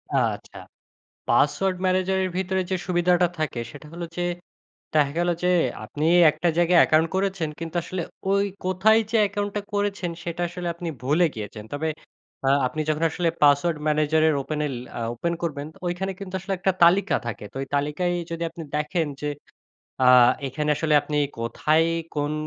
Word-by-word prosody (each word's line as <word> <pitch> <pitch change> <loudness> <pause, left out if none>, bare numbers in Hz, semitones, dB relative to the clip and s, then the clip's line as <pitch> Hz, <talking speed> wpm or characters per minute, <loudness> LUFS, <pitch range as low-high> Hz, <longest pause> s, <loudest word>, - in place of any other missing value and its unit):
আচ্ছা - - -1 0.7
পাসওয়ার্ড 190 -1 +2
ম্যানেজারের 185 0 +1
ভিতরে 190 0 0
যে - - +2
সুবিধাটা 175 0 +3
থাকে 150 -6 -2
সেটা 150 - -12
হলো 170 0 -5
যে 175 - 0 0.7
দেখা 145 -2 +4
গেলো 175 0 +2
যে 180 - +3 0.4
আপনি 150 +8 -3 0.3
একটা 175 - -2
জায়গায় 175 0 +5
অ্যাকাউন্ট 155 +1 +4
করেছেন 190 -4 -1
কিন্তু 165 0 -6
আসলে 185 +1 -4 0.3
ঐ - - +3 0.3
কোথায় 190 +5 +4
যে 230 - +3
অ্যাকাউন্টটা 205 0 -2
করেছেন 205 -3 -1
সেটা 170 0 -4
আসলে 175 0 -5
আপনি 170 0 -6 0.2
ভুলে 150 +7 +3
গিয়েছেন। 105 0 -7
তবে 160 +2 -2 0.6
আ - - +5 0.2
আপনি 155 +5 -4
যখন 155 +1 0
আসলে 175 0 0
পাসওয়ার্ড 145 +3 +4
ম্যানেজারের 155 +1 +3
ওপেনে 150 +1 -2
ল - - -5 0.4
ওপেন 170 +8 -2
করবেন 145 -3 -3 0.2
ঐখানে 185 +2 -2
কিন্তু 195 -2 -8
আসলে 195 +2 -3
একটা 185 +2 +1
তালিকা 190 +4 +5
থাকে। 110 -2 -5
তো - - -6
ঐ - - -3
তালিকায় 150 +5 0 0.2
যদি 165 0 -3
আপনি 165 - -9
দেখেন 155 +2 0
যে 150 - -1 0.8
আ - - +7 0.4
এখানে 150 +3 -2
আসলে 155 0 +1
আপনি 150 0 -3 0.2
কোথায় 155 +7 +2 0.3
কোন 145 0 -1
170 Hz, 160 wpm, -24 LUFS, 150-185 Hz, 0.8 s, আ